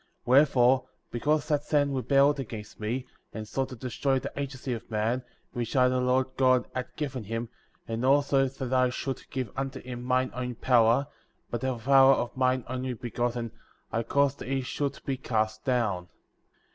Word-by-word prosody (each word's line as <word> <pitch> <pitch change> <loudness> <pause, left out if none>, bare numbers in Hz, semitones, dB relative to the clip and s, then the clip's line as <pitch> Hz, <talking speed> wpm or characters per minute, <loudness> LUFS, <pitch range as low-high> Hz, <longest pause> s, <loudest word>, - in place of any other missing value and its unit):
* - - -46
3. - - -2
Wherefore, 130 -2 +5 0.2
because 150 +5 0
that 150 -2 +1
Satan 145 -2 +1
rebelled 140 +3 +3
against 110 -5 -7
me,^ 120 +4 -2 0.3
and 110 -1 -6
sought 135 +4 -2
to 130 - -7
destroy 130 +3 -1
the 135 +2 -4
agency 135 -2 -4
of 115 0 -7
man,*' 110 +3 0 0.3
which 120 0 -4
I, 125 -1 +5
the 130 0 +1
Lord 125 +1 +2
God, 130 -2 +4
had 130 0 -3
given 135 -6 -4
him, 115 +2 -3 0.4
and 115 +1 -3
also, 140 0 +4
that 130 -1 -5
I 130 -1 +4
should 130 +1 -5
give 130 -5 -3
unto 135 0 -3
him 125 -1 -7
mine 130 +1 +1
own 125 0 -4
power; 120 +2 +4 0.5
by 120 - -1
the 130 0 -1
power 135 +3 +6
of 120 -1 -3
mine 130 -1 +2
Only 130 0 -3
Begotten,^ 120 0 -2 0.4
I 115 - 0
caused 140 +4 +1
that - - -7
he 135 0 0
should 140 +2 -3
be 135 -1 -1
cast 110 -4 -1
down;*" 110 -9 0
4. - - -37
130 Hz, 185 wpm, -28 LUFS, 120-135 Hz, 0.5 s, power